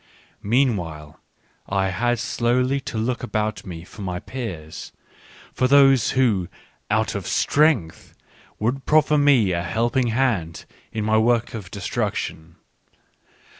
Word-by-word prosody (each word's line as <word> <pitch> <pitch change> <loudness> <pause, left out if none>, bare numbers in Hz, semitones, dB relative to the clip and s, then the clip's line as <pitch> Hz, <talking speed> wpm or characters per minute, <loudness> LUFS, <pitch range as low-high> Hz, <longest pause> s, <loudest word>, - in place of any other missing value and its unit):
Meanwhile, 100 - -1 0.5
I 95 -1 +1
had 120 +6 0
slowly 125 +4 0
to 120 - -6
look 120 +3 -1
about 110 -4 -3
me 85 -2 -7
for 105 - -12
my 90 -2 -3
peers, 90 -13 -7 0.6
for 130 - +1
those 135 -3 +5
who, 105 -9 +2 0.4
out - - +1
of - - -5
strength) 145 - +1 0.4
would 125 +5 -2
proffer 150 -1 +4
me 135 -9 +4
a 85 -1 0
helping 120 +8 0
hand 115 -9 -1 0.3
in 110 -1 -3
my 110 0 +3
work 115 +1 +1
of 105 -6 -7
destru 100 -3 -2
ction. 80 +1 -6
115 Hz, 130 wpm, -22 LUFS, 95-130 Hz, 0.6 s, those